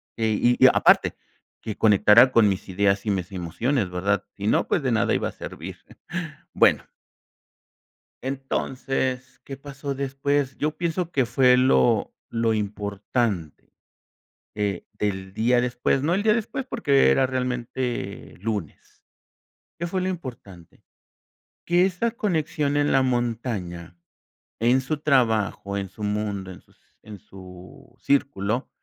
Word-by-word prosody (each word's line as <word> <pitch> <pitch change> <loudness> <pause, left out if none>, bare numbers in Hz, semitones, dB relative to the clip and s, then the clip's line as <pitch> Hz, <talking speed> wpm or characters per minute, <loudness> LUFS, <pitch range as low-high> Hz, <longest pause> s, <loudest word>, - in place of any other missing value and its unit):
y 115 +2 +2
y - - +10
aparte - - +4 0.5
que 110 - -5
conectara 105 +4 +6
con 115 -3 +5
mis 95 0 -2
ideas 100 +2 +1
y - - -1
mis 95 -1 -3
emociones 95 - -1
¿verdad? 100 +3 0
Si 100 - -3
no, - - +2
pues, 160 - +1
de 130 -3 0
nada 110 - +2
iba - - 0
a - - -5
servir. - - -8 0.8
Bueno - - +3 1.3
Entonces, 130 -1 -3
¿qué 135 - -8
pasó 140 0 -6
después? 135 0 -1
Yo 150 +1 0
pienso 170 0 -2
que 135 -3 +2
fue 125 +1 +4
lo 125 -4 +3 0.2
lo 115 -1 0
importante, 100 - -3 0.8
eh, 100 -3 -2
del 95 -2 -3
día 120 +4 +2
después, 125 +2 0
no 165 +4 +1
el 195 - 0
día 215 0 +4
después, 235 +3 -3
porque 145 - +3
era 135 - +3
realmente 125 -4 -3
lunes. 105 -6 -5 0.8
¿Qué 170 - -3
fue 185 +1 -2
lo 185 - -1
importante? 115 - -9 0.8
Que 175 +2 +3
esa 195 +5 -1
conexión 160 - -1
en 145 0 +2
la 135 - +4
montaña, 115 -9 -3 0.6
en 120 +4 +3
su 140 +4 -3
trabajo, 115 -8 +1
en 100 -1 -4
su 100 +3 -10
mundo, 105 -2 -2
en 90 - -12
sus - - -29 0.2
en 105 -2 -11
su 90 -1 -14
círculo, 125 -4 0
120 Hz, 135 wpm, -24 LUFS, 100-135 Hz, 1.3 s, y